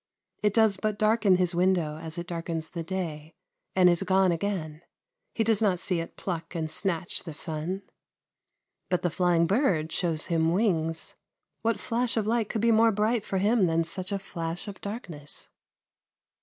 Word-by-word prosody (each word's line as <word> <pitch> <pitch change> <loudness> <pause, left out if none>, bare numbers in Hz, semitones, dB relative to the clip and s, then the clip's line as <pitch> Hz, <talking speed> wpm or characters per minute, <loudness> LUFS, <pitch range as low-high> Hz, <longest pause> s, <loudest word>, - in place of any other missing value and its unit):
It 210 -1 +2
does 220 -3 +4
but 215 +1 -1
darken 215 -2 +4
his 180 -1 +2
window 175 -4 +1
as 160 0 -5
it 170 - -3
darkens 165 -2 -4
the 170 - -5
day, 165 -3 -4 0.4
and 185 -1 +6
is 175 0 +4
gone 190 -1 +3
again; 165 -4 -2 0.5
he 225 - +2
does 225 -1 +2
not 195 -4 +3
see 180 0 -1
it 165 - -6
pluck 175 -1 -4
and 160 -2 -2
snatch 175 0 -2
the 160 -4 -7
sun. 165 +5 -4 1.1
But 180 -1 0
the 175 - +1
flying 175 -1 +3
bird 180 - +1
shows 165 -4 -1
him 165 -1 +2
wings. 165 -6 0 0.5
What 230 0 +1
flash 235 0 -1
of 220 - +1
light 225 -1 +1
could 220 - -1
be 230 0 +4
more 225 +1 +5
bright 215 +2 +1
for 195 - -2
him 205 0 +3
than 165 0 +2
such 185 +3 -5
a 200 - +1
flash 170 -2 -5
of 200 -2 -8
darkness? 180 - -5
185 Hz, 175 wpm, -28 LUFS, 165-205 Hz, 1.1 s, and